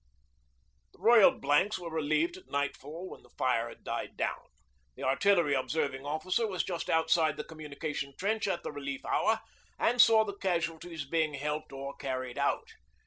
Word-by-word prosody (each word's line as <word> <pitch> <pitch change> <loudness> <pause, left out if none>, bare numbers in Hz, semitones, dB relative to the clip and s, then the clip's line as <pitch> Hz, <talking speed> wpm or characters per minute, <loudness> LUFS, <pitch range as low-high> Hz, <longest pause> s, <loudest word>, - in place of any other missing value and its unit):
The - - -22
Royal 220 +1 +7
Blanks 145 +9 +1
were 175 -2 -7
relieved 160 +2 +1
at 185 - -14
nightfall 145 +5 -3
when - - -10
the - - -21
fire 120 -2 +1
had - - -14
died - - -4
down. - - -2 0.5
The - - -8
Artillery 170 +3 +3
Observing 135 0 -1
Officer 185 +9 0
was 185 -3 -1
just 175 -3 -4
outside 160 -1 +3
the 150 - -3
communication 150 -2 -5
trench 215 +2 0
at 185 -3 -1
the - - -4
relief 140 -2 -5
hour 220 0 +2 0.4
and 245 +1 +4
saw 220 -1 +6
the 200 - -4
casualties 170 -4 -2
being 155 0 0
helped 150 +2 -3
or 140 0 -6
carried 130 -1 -4
out. 140 - 0
155 Hz, 165 wpm, -31 LUFS, 140-185 Hz, 0.5 s, Royal